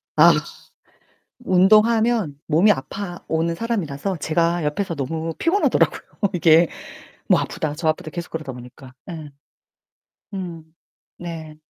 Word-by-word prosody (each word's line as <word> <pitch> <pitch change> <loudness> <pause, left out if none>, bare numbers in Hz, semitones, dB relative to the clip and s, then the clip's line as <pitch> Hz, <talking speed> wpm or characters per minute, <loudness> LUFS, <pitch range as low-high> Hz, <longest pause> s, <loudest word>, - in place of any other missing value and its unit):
아. - - +8 1.1
운동하면 215 - +3
몸이 170 +7 +5
아파 175 +4 -4
오는 165 +1 0
사람이라서 190 -5 -2
제가 170 +2 0
옆에서 165 +3 -2
너무 160 +4 -3
피곤하더라고요, 385 +5 +2 0.3
이게. 165 -1 +5 0.6
뭐 - - +4
아프다, 150 -1 -3
저 160 0 0
아프다 155 0 -2
계속 170 +1 -6
그러다 155 -5 -5
보니까 125 +1 -12 0.2
예. 155 -4 -7 1.0
음. 175 -4 -6 0.5
네. 160 -3 -7
165 Hz, 260 characters per minute, -22 LUFS, 155-190 Hz, 1.1 s, 아